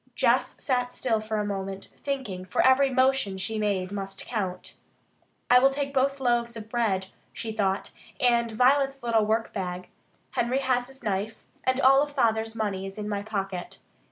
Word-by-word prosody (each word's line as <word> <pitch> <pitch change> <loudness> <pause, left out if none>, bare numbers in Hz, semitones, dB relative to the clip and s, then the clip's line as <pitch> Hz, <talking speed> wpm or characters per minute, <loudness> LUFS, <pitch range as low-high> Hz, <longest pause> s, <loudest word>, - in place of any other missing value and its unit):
Jess - - +2
sat 250 -2 0
still 230 -4 +1
for 215 0 -3
a 210 - 0
moment, 195 -1 -4
thinking, 260 -10 -3
for 185 - 0
every 265 +1 +5
motion 260 -6 +2
she 215 +4 -3
made 195 -3 0
must 195 -1 -5
count. 190 -6 -4 0.7
"I 250 +1 +7
will 270 +2 +5
take 275 0 -3
both 275 +1 +1
loaves 240 -2 +1
of 220 -1 -9
bread," 195 -6 0 0.2
she 225 - -5
thought, 200 -2 -1 0.3
"and 235 -2 +3
Violet's 270 +3 +3
little 225 -3 +2
workbag. 190 -5 -2 0.4
Henry 240 +2 0
has 255 -2 +1
his 270 -1 -15
knife. 210 +1 -1 0.3
And 260 0 +2
all 270 +2 +6
Father's 225 -5 0
money 195 -3 -2
is 195 - -9
in 210 -1 -4
my 205 -1 -2
pocket." 195 -4 -4
225 Hz, 165 wpm, -27 LUFS, 200-260 Hz, 0.7 s, I